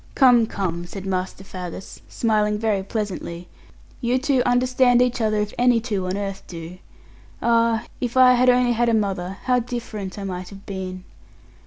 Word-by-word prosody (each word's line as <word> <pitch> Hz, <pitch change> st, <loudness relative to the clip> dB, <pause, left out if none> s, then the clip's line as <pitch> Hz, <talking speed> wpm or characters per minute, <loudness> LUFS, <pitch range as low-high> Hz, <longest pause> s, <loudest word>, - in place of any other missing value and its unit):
'Come, 245 Hz, -4 st, +5 dB
come,' 175 Hz, -4 st, -3 dB
said 195 Hz, +2 st, -8 dB
Master 185 Hz, 0 st, -3 dB
Faggus, 185 Hz, -1 st, -8 dB
smiling 210 Hz, -2 st, +1 dB
very 210 Hz, -2 st, 0 dB
pleasantly, 190 Hz, -4 st, -5 dB, 0.5 s
'you 245 Hz, 0 st, +1 dB
two 265 Hz, -1 st, +1 dB
understand 250 Hz, 0 st, +3 dB
each 250 Hz, -1 st, +1 dB
other, 215 Hz, -1 st, +1 dB
if 210 Hz, 0 st, -1 dB
any 245 Hz, -1 st, +4 dB
two 205 Hz, -5 st, -3 dB
on 185 Hz, +2 st, -2 dB
earth 195 Hz, -1 st, -4 dB
do. 170 Hz, +1 st, -9 dB, 0.6 s
Ah, 230 Hz, -1 st, +2 dB, 0.2 s
if 245 Hz, 0 st, -2 dB
I 255 Hz, -1 st, +8 dB
had 250 Hz, +1 st, +4 dB
only 250 Hz, 0 st, +4 dB
had 240 Hz, 0 st, +2 dB
a 230 Hz, -, +3 dB
mother, 195 Hz, -3 st, -2 dB
how 250 Hz, -1 st, +3 dB
different 225 Hz, -5 st, -5 dB
I 200 Hz, -, -5 dB
might 185 Hz, -1 st, -5 dB
have 195 Hz, -1 st, -13 dB
been!' 185 Hz, -1 st, -6 dB
215 Hz, 170 wpm, -22 LUFS, 190-245 Hz, 0.6 s, I